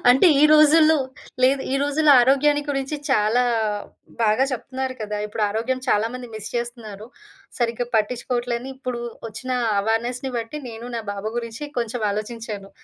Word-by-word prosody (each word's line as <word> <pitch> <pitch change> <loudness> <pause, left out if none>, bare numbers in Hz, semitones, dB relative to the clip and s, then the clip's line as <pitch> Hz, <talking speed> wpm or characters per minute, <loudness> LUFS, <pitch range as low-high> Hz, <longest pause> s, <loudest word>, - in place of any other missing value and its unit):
అంటే, 265 +8 +6 0.2
ఈ - - +8
రోజుల్లో 310 +1 +6 0.5
లేదు. 265 +2 +4
ఈ - - +2
రోజుల్లో 290 +1 +4
ఆరోగ్యాన్ని 290 +3 +3
గురించి 275 +1 -2
చాలా 225 0 +3 0.8
బాగా 220 +4 +3
చెప్తున్నారు 260 +1 -4
కదా! 210 0 -3
ఇప్పుడు 210 +1 -4
ఆరోగ్యం 230 +5 -1
చాలా 210 0 +3
మంది 255 -1 -6
మిస్ 215 -1 -6
చేస్తున్నారు. 230 -3 -6 0.5
సరిగ్గా 240 0 -1
పట్టిచ్చుకోవట్లే 240 +2 0
అని 260 +2 -7
ఇప్పు‌డు 250 -2 -4 0.3
ఒచ్చినా 250 +4 -4 0.2
అవేర్‌నెస్‌ని 240 +5 -1
బట్టి, 230 +6 -5
నేను 230 +1 -8
నా - - -2
బాబు 200 +1 -4
గురించి 230 +3 -4
కొంచమాలోచించాను. 215 -2 -3
240 Hz, 140 wpm, -23 LUFS, 220-265 Hz, 0.8 s, ఈ